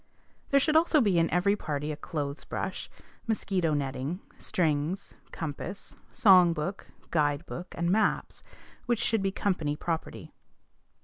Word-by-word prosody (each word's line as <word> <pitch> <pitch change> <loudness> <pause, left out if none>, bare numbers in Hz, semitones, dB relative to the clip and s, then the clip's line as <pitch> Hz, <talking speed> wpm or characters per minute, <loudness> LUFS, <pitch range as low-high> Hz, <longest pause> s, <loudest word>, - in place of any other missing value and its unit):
" - - -36
There 275 - +5
should 305 +3 +1
also 320 -1 +5
be 200 -9 +3
in 165 - +2
every 190 +4 +3
party 150 -5 -3
a - - -3
clothes 145 -1 -4
brush, - - -4 0.4
mosquito 185 -7 0
netting, 140 +4 -2 0.2
strings, 160 +1 -1 0.2
compass, 165 +5 -6 0.2
song 185 -7 +6
book, 170 +5 -4 0.2
guide 145 0 +1
book, 175 +1 -7
and 170 +1 +1
maps, 215 +1 +1 0.5
which 240 -1 +2
should 225 -1 +1
be 195 0 0
company 170 -7 -1
property. 165 +1 -4
175 Hz, 140 wpm, -29 LUFS, 150-200 Hz, 0.5 s, song